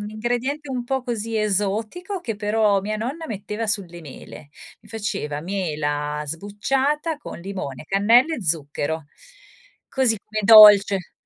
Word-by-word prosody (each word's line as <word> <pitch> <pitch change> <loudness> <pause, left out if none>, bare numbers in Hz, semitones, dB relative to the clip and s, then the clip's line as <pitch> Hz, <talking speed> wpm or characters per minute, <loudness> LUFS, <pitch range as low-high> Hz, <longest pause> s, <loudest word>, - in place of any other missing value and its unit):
un 205 0 -6
ingrediente 245 +6 -3
un 250 -2 -3
po' 265 +2 -2
così 230 -2 -3
esotico, 215 - -2
che 225 -10 -4
però 210 -1 +1
mia 210 +2 -3
nonna 275 +9 -5
metteva 210 +1 -5
sulle 180 -5 -2
mele. 145 -1 -12 0.3
Mi - - -20
faceva 200 -10 -4
mela 150 -5 -3
sbucciata 265 - -2
con 295 - -10
limone, 170 -8 -6
cannella 230 - +3
e 230 - -6
zucchero; 160 -1 -2 0.8
così 250 -5 +1
come 215 +1 -5
dolce. 205 -3 +7
210 Hz, 135 wpm, -22 LUFS, 185-240 Hz, 0.8 s, dolce